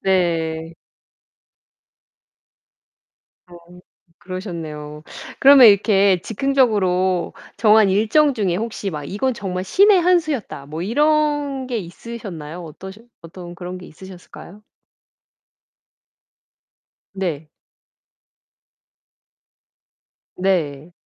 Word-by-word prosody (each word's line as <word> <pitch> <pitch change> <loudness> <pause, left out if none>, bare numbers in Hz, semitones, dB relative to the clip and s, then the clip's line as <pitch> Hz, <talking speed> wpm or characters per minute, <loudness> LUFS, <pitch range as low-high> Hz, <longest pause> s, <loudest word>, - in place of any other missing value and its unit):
네. 165 -3 -1 2.7
어 175 - -15 0.6
그러셨네요. 160 -5 -7 0.4
그러면 270 -3 +8
이렇게 200 -2 +3
즉흥적으로 200 -8 0 0.2
정한 215 -2 +5
일정 235 +9 +2
중에 190 -6 -1
혹시 215 -2 -4
막 150 -3 -6
'이건 235 - -2
정말 185 -4 -4
신의 390 - +4
한 360 +1 +4
수였다.' 275 - -5
뭐 155 +3 -6
이런 290 +3 0
게 240 -3 -2
있으셨나요? 180 -4 -8
어떠셔 190 +7 -11 0.2
어떤 175 +1 -11
그런 180 +1 -7
게 180 - -12
있으셨을까요? 190 +3 -13 2.5
네. 170 -6 -4 2.9
네. 170 -5 -2
190 Hz, 175 characters per minute, -20 LUFS, 170-235 Hz, 2.9 s, 그러면